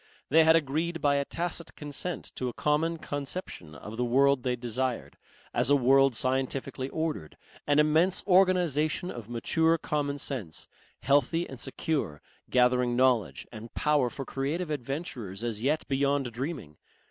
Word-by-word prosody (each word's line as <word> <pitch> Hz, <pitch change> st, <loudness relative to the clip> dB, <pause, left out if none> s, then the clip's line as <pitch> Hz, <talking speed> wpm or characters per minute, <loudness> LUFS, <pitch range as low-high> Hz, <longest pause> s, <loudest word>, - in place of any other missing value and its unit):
They 160 Hz, +3 st, +6 dB
had 160 Hz, 0 st, +6 dB
agreed 165 Hz, +3 st, 0 dB
by 145 Hz, -2 st, +2 dB
a 140 Hz, -, 0 dB
tacit 170 Hz, +1 st, -3 dB
consent 150 Hz, +3 st, -4 dB
to 125 Hz, -, -3 dB
a -, -, -7 dB
common 160 Hz, +5 st, 0 dB
conception 140 Hz, -, -5 dB
of 105 Hz, +9 st, -9 dB
the 125 Hz, -, 0 dB
world 135 Hz, +2 st, +3 dB
they 125 Hz, 0 st, 0 dB
desired 125 Hz, +1 st, -3 dB, 0.4 s
as 120 Hz, +2 st, +2 dB
a 145 Hz, -, +6 dB
world 135 Hz, 0 st, +4 dB
scientifically 130 Hz, +1 st, -1 dB
ordered, 155 Hz, -, -3 dB, 0.3 s
an 145 Hz, 0 st, +3 dB
immense 155 Hz, +5 st, +4 dB
organization 180 Hz, -3 st, +2 dB
of 115 Hz, -2 st, -9 dB
mature 160 Hz, +8 st, +2 dB
commonsense, 140 Hz, -, -3 dB, 0.3 s
healthy 145 Hz, +5 st, +2 dB
and 135 Hz, -, -9 dB
secure, 135 Hz, -, -2 dB, 0.3 s
gathering 125 Hz, -1 st, +3 dB
knowledge 125 Hz, -5 st, +2 dB
and 115 Hz, 0 st, -10 dB
power 150 Hz, -4 st, +2 dB
for 135 Hz, +2 st, -6 dB
creative 155 Hz, +6 st, -3 dB
adventures 125 Hz, -, -5 dB
as 115 Hz, -3 st, -2 dB
yet 145 Hz, +5 st, 0 dB
beyond 140 Hz, -1 st, +1 dB
dreaming. 125 Hz, -, -5 dB
140 Hz, 145 wpm, -28 LUFS, 125-155 Hz, 0.4 s, They